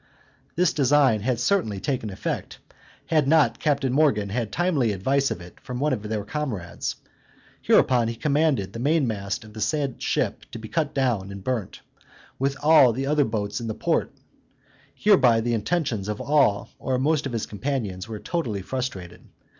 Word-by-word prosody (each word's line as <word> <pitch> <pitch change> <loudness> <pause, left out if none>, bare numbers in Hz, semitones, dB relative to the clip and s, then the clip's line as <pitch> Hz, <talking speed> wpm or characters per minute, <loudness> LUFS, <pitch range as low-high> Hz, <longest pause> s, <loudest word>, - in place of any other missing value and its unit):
This 180 -1 +2
design 140 -5 +3
had 120 +1 0
certainly 125 - +1
taken 125 -2 -2
effect, 95 - -4 0.5
had 155 -4 +2
not 150 -5 +3
Captain 140 -4 +1
Morgan 130 -9 +2
had 110 0 -2
timely 155 - +1
advice 135 +8 +1
of 85 - -4
it 85 +1 -13
from 125 -2 -6
one 150 0 +1
of 115 - -2
their 105 -1 -3
comrades; 105 - -4 0.7
hereupon 120 -3 +4
he 115 - -3
commanded 145 -6 +1
the 115 - -6
mainmast 115 -9 0
of 110 -1 -14
the 110 - -7
said 140 +3 -1
ship - - -1
to - - -5
be 110 -1 -8
cut 155 -3 -1
down 120 -8 0
and 100 -1 -8
burnt, 120 -5 -3 0.6
with 135 +1 0
all 150 -6 +6
the 135 +4 -2
other 145 0 +2
boats 105 -1 -3
in 115 - -4
the 110 - -3
port: - - 0 0.8
hereby 130 - +4
the 120 +1 -1
intentions 115 - -1
of 105 0 -3
all 140 -9 +2
or 130 -1 -1
most 145 +2 +1
of - - -6
his 115 -2 -2
companions 105 -4 -3
were 110 -1 -5
totally 110 - -3
frustrated. 100 -8 -5
125 Hz, 170 wpm, -24 LUFS, 105-145 Hz, 0.8 s, all